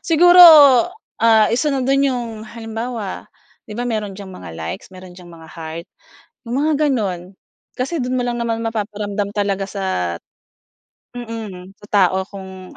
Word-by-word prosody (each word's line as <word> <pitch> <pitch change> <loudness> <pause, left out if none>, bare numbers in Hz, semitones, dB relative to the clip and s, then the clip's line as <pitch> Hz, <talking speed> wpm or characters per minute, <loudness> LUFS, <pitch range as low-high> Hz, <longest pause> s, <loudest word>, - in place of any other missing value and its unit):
siguro, 350 +2 +5 0.8
ah, 225 -2 +5
1 255 +6 +1
na 270 -3 -1
do'n 275 +1 +2
'yong 245 -3 -3 0.2
halimbawa, 225 -2 -6 0.4
‘di 210 - -8
ba 240 - -3
meron 215 -5 -3
diyang 195 -2 -10
mga 85 - -10
likes, 80 0 -7
meron 185 -1 -13
diyang 180 -1 -14
mga 165 -2 -14
heart, 165 0 -7 0.6
‘yong 235 - -5
mga 310 +1 +1
gano'n, 195 -9 -2 0.4
kasi 270 +7 -3
do'n 255 -3 -2
mo 255 - 0
lang 245 -1 -2
naman 230 -1 -2
mapaparamdam 210 -2 -3
talaga 200 -1 -1
sa 195 0 -6 1.3
mm, 220 -6 -8
sa 205 - -14
tao 190 -2 +2
kung 190 -2 -11
210 Hz, 150 wpm, -19 LUFS, 190-240 Hz, 1.3 s, siguro